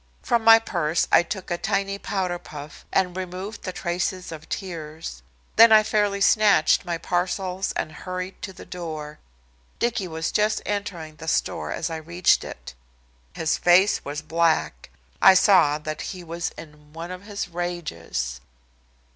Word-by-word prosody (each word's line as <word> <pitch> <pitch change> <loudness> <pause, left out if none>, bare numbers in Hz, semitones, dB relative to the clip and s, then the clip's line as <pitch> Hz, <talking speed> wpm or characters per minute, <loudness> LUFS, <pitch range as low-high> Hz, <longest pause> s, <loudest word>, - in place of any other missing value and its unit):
From 235 -1 +1
my 225 0 +9
purse 170 -7 0
I - - +7
took 180 +1 -6
a 175 - -1
tiny 200 -1 -1
powder 185 -4 -2
puff 145 -2 -11
and 180 -2 +1
removed 185 +3 -6
the 185 - -4
traces 180 0 -3
of 160 -1 -9
tears. 160 - -6 0.4
Then 230 +1 +9
I 215 -1 +8
fairly 205 -2 +1
snatched 205 -5 +4
my 170 -1 -2
parcels 185 +2 -1
and - - -3
hurried 185 +3 -6
to 195 - -5
the 185 - -12
door. 155 -4 -7 0.6
Dicky 235 -5 -1
was 160 -1 -3
just 215 0 +2
entering 175 -7 -4
the 160 - -9
store - - -1
as 165 0 -3
I 160 - -3
reached 170 +3 +2
it. - - -9 0.6
His 160 -1 -1
face 185 +3 +4
was 145 +2 -5
black. 160 - 0 0.3
I 190 - +8
saw 180 -6 +5
that 155 0 -5
he 185 -2 -6
was 170 0 -3
in 150 -1 -13
one 165 +2 -7
of 185 +2 -8
his 205 -3 -4
rages. 85 - -4
175 Hz, 155 wpm, -24 LUFS, 160-195 Hz, 0.6 s, my